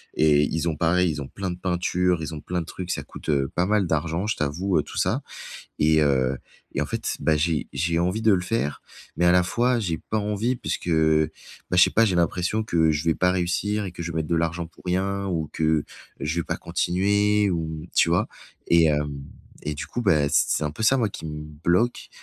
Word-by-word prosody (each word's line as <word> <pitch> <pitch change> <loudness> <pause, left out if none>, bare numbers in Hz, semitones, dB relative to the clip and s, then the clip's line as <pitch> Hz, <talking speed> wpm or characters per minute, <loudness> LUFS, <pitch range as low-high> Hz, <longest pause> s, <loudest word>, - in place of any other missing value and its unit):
et 75 -1 +4
ils 80 +3 -1
ont 80 - -2
pareil, 85 +2 +2
ils 75 -1 -4
ont 65 - -6
plein 95 -2 -4
de 90 - -6
peinture, 90 -1 0
ils 80 +1 -5
ont 75 - -7
plein 90 0 -3
de - - -6
trucs, 90 +1 -6
ça - - -3
coûte, - - -10
heu, 70 -2 +1
pas 90 - +2
mal 105 -3 +2
d'argent, 80 +5 -1
je 110 - 0
t'avoue, 85 +6 0
heu, - - 0
tout - - -10
ça - - +1 0.6
et 80 0 +4
heu 65 -2 +2 0.4
et - - +2
en - - -2
fait, - - -3
bah 80 -1 +2
j'ai 80 0 0
j'ai 85 0 0
envie 90 +6 0
de 110 -2 +5
le 90 - +1
faire 90 -8 -2 0.4
mais 85 - +1
à 85 - +6
la 90 0 +5
fois, 120 +5 +1
j'ai 85 -6 -2
pas 110 - +1
envie 105 +4 -1
puisque, 90 - -4
bah, 80 +2 0
je 90 - +7
sais - - +5
pas, 115 - +4
j'ai 95 - +1
l'impression 90 +5 +1
que 80 -5 +2
je 75 +2 -2
vais 80 -1 +2
pas 90 0 +2
réussir 100 +4 -1
et 90 - -6
que 85 - -7
je 85 0 -4
vais - - -5
mettre 80 -2 -2
de 85 - +1
l'argent 85 +1 -1
pour - - -21
rien 100 +2 -1
ou 80 -5 -2
que 80 -2 +1 0.4
je 80 +3 -2
vais - - -3
pas - - -2
continuer 100 +2 +1
ou 80 -1 -3
tu - - +4
vois? 85 - +2 0.4
Et 85 -1 +5
hem 75 -2 -1 0.4
et 75 0 -3
du 75 - -5
coup 120 - -4
bah, 75 -8 +3
c 70 0 +4
c'est 75 - 0
un 75 - -1
peu 110 - -6
ça, 135 +5 +5
moi, 110 -3 +1
qui 80 - -8
me 75 0 -6 0.2
bloque 95 +8 +1
85 Hz, 240 wpm, -24 LUFS, 80-95 Hz, 0.6 s, je